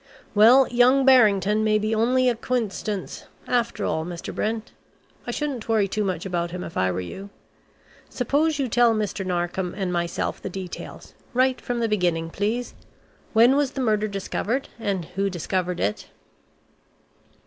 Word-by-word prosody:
Well, 235 +5 +7
young 250 +3 +4
Barrington 215 -5 +5
may 215 -1 +3
be 215 +1 -1
only 250 +4 +2
a 245 - +4
coincidence 220 -4 -3 0.2
after 235 -1 0
all, 160 - -1
Mr. 175 0 -6
Brent. 220 +1 -3 0.6
I - - -3
shouldn't 275 -7 -3
worry 215 -3 +3
too 210 +2 -1
much 185 -3 -2
about 175 -2 -2
him 180 +1 -6
if 165 - -8
I 95 0 +1
were 90 +1 -3
you. 190 - -8 0.8
Suppose 290 +5 0
you 275 -3 0
tell 240 0 +3
Mr. 210 -2 -2
Narkom 180 0 -2
and 190 -3 -2
myself 170 -1 -2
the - - -5
details, 185 -1 -8 0.2
right 255 0 +2
from 240 -1 -3
the 230 - +1
beginning, 175 -6 0
please? 225 +6 -2 0.6
When 235 +4 +6
was 280 -2 +1
the 270 - -3
murder 215 -3 +1
discovered 210 +5 -3
and 195 -6 -2
who 195 +4 -2
discovered 180 0 -2
it?" 105 +1 -2
215 Hz, 160 wpm, -24 LUFS, 185-245 Hz, 0.8 s, Well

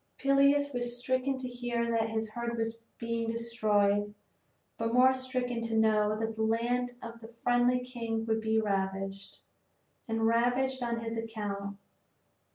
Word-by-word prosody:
Peleus 280 +1 +3
was 240 -1 0
stricken 260 +2 0
to 260 -1 -4
hear 240 -1 -2
that 225 -1 +1
his 220 -1 -2
herd 235 +1 -3
was 225 0 -2 0.2
being 230 0 -2
destroyed, 210 -3 +1 0.6
but 225 0 -2
more 260 +1 +6
stricken 255 -2 -2
to 230 -1 -1
know 215 -1 +3
that 225 0 -2
the 220 - -4
land 240 +2 0
of 230 0 -9
a - - -8
friendly 245 +2 +2
king 230 -3 -3
would 220 0 0
be 220 0 +2
ravaged, 195 -1 -2 0.7
and 225 0 0
ravaged 245 +3 +2
on 235 -1 -1
his 230 0 -4
account. 205 -3 -4
230 Hz, 150 wpm, -30 LUFS, 220-245 Hz, 0.7 s, more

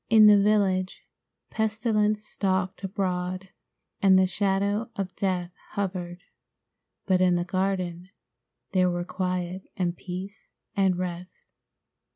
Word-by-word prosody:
In 220 -1 +8
the 205 -1 +8
village, 195 -3 +1 0.5
pestilence 215 -1 +1
stalked 190 -2 -1
abroad 185 -1 -2 0.5
and 190 -1 +6
the 190 - +5
shadow 200 +3 0
of 190 -2 -4
death 180 -2 -1 0.2
hovered, 180 -3 -3 0.8
but 185 -2 +3
in 180 -1 +4
the 175 0 0
garden 185 -1 -2 0.6
there 185 -1 +3
were 175 0 -1
quiet 185 0 -3
and 175 -2 0
peace 185 +3 -8 0.3
and 190 -3 +2
rest. 180 0 -6
185 Hz, 115 wpm, -26 LUFS, 180-200 Hz, 0.8 s, In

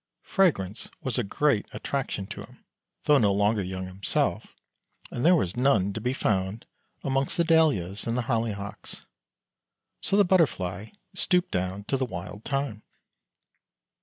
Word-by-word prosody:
Fragrance 120 - +1
was 130 -4 0
a - - +1
great 115 +1 +1
attraction 135 -8 -3
to - - -7
him, - - -15 0.4
though 145 -1 +5
no 105 -4 +4
longer 105 +2 +2
young 95 0 -4
himself, 95 +2 -1 0.6
and 120 - -3
there 180 +3 +6
was 95 - 0
none 110 -7 +2
to 110 - -5
be 125 - 0
found 100 -3 -1 0.4
among 135 0 +1
the 170 - +1
Dahlias 145 - +2
and 115 +1 0
Holly 115 -2 0
hocks. 100 +1 -8 1.0
So 200 - +1
the 205 - +6
Butterfly 110 - +1 0.3
stooped 180 -1 +1
down 95 +2 -2
to 135 - -1
the 130 - 0
Wild 100 0 -7
Thyme. 135 -6 -2
110 Hz, 145 wpm, -27 LUFS, 100-140 Hz, 1.0 s, there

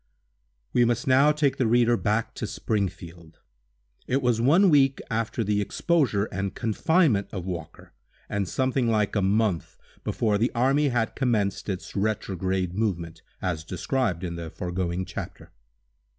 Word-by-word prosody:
_ - - -47 0.7
WE 120 - +4
must 120 0 +1
now 135 +3 +5
take 145 -3 +1
the 125 - +2
reader 120 +1 +4
back 110 0 -1
to - - -4
Springfield. 85 -5 -4 0.7
It 135 +2 0
was 120 -2 +2
one 170 +9 +5
week 135 -2 +4
after 115 +1 -1
the 105 0 +1
exposure 125 - +1
and 95 +1 -3
confinement 115 - +2
of 90 -4 -5
Walker, 85 -4 -7 0.3
and 100 -2 -2
something 130 -1 0
like 105 -2 +1
a 100 - +2
month 100 -2 0 0.3
before 105 -3 0
the 120 - +1
army 135 +5 +3
had 120 -3 -1
commenced 110 -7 0
its 95 -1 -5
retrograde 95 -3 -1
movement, 85 -6 -2 0.2
as 85 -4 -2
described 95 - -2
in 85 -1 -4
the 85 -1 -6
foregoing 90 +1 -3
chapter. 90 - -8
105 Hz, 150 wpm, -26 LUFS, 95-125 Hz, 0.7 s, now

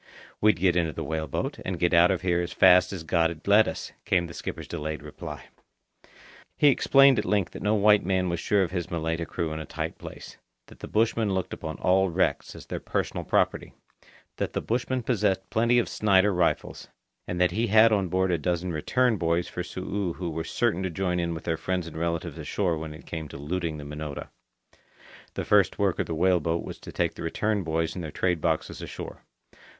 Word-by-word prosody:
"We'd 105 -1 +5
get 90 -1 +3
into 85 -3 +1
the - - -4
whale 80 0 -3
boat, - - -3
and 95 -1 -3
get 85 +2 +1
out 85 +1 +6
of 95 -2 -1
here 90 -1 +2
as 85 - -4
fast 90 -1 +6
as 90 -4 -5
God'd 80 0 0
let 105 +2 +6
us," - - -5
came 90 -2 +2
the 80 - -9
skipper's - - -6
delayed 75 0 -4
reply. 75 -1 -8 1.1
He 145 - +6
explained 135 -1 +5
at - - 0
length 100 -4 0
that - - -9
no 105 +1 +2
white 105 0 +5
man 95 0 +1
was 85 -1 -2
sure 100 +3 +2
of 85 - -3
his 90 -3 -3
Malaita 80 0 -2
crew 80 -2 -3
in 80 - -4
a 80 - -6
tight - - -5
place; - - -10 0.3
that - - -17
the - - -7
bushmen 110 -2 +1
looked 95 - -2
upon 80 - -6
all 95 +1 +3
wrecks 85 - 0
as - - -11
their - - -5
personal - - -2
property; - - 0 0.6
that - - -2
the - - 0
bushmen 125 +2 -1
possessed 95 -5 0
plenty 115 +2 +3
of 120 - +2
Snider 100 -1 +3
rifles; 90 -1 -1 0.4
and 90 - -3
that 90 0 +3
he 115 +6 0
had 110 +2 +6
on 100 -3 +2
board 95 +1 +1
a 85 - +1
dozen 90 +2 -1
"return" 120 +9 +1
boys 85 0 0
for - - -5
Su'u 95 +1 -3
who 85 -1 -4
were 80 +1 -3
certain 110 +1 0
to 95 - -1
join 90 0 -1
in 85 -1 -1
with 80 - -7
their 80 -1 -1
friends 90 0 -2
and 85 - -9
relatives 85 0 -3
ashore 90 -5 -1
when 80 -1 -6
it 80 - -14
came 80 -2 -5
to - - -9
looting 80 +2 -3
the 75 - -8
Minota. 75 0 -6 1.1
The - - -3
first 105 -2 +3
work 100 -3 +1
of - - 0
the 80 - -3
whale 90 +2 +3
boat 85 +2 -1
was - - -8
to - - -10
take - - 0
the - - -10
"return" 105 +5 -1
boys 80 -1 -1
and 90 - -6
their 80 - -5
trade 90 +1 -1
boxes 80 -1 -1
ashore. - - -8
90 Hz, 215 wpm, -26 LUFS, 80-100 Hz, 1.1 s, out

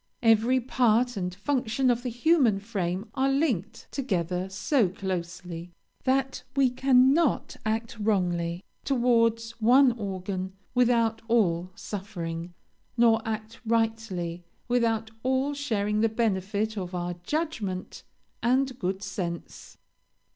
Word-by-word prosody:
Every 230 +3 +4
part 245 -1 +2
and 180 -2 -3
function 255 +3 +1
of 240 0 0
the 250 - -3
human 245 -4 +3
frame 195 -1 -3
are 270 0 +1
linked 240 - -1
together 185 - -1
so 200 +3 +1
closely, 175 -2 -5 0.3
that 265 0 +1
we 270 -3 +4
cannot 265 +3 +3
act 225 +1 -2
wrongly 180 -4 0 0.2
towards 230 -3 +2
one 255 +4 +6
organ 190 -3 -4 0.2
without 230 -2 +2
all 185 -7 +2
suffering, 175 -4 -6 0.4
nor 230 -1 +5
act 220 0 -4
rightly 220 -7 -1 0.2
without 230 -2 +1
all 265 +3 +1
sharing 215 -7 0
the 225 - +3
benefit 215 -1 -1
of 180 -1 -5
our 175 0 -2
judgment 220 - -3 0.4
and 255 +1 +1
good 190 +1 -2
sense. 180 -3 -6
225 Hz, 110 wpm, -27 LUFS, 185-245 Hz, 0.4 s, one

